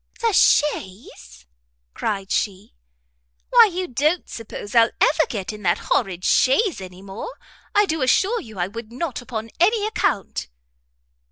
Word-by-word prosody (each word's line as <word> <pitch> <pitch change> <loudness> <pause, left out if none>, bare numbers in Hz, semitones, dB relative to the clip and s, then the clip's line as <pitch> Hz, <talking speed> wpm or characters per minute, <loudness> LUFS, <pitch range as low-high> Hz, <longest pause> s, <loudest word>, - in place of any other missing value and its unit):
"The 460 -2 +1
chaise?" 185 - 0 0.5
cried 195 -3 -3
she, 195 -2 -2 0.8
"why 470 -3 +7
you 365 +1 -3
don't 305 +7 0
suppose 210 -2 -8
I'll 230 -1 +5
ever 315 +1 +4
get 205 -2 -4
into 210 - -10
that 175 -3 +2
horrid 185 -5 -1
chaise 285 - +3
any 185 0 -10
more? 200 - -7 0.5
I 415 0 +5
do 320 -5 -2
assure 385 - +2
you 220 -3 -12
I 175 - 0
would 230 +2 -9
not 255 0 -4
upon 225 -3 -6
any 415 +4 +3
account." 295 - -1
230 Hz, 145 wpm, -22 LUFS, -, 0.8 s, why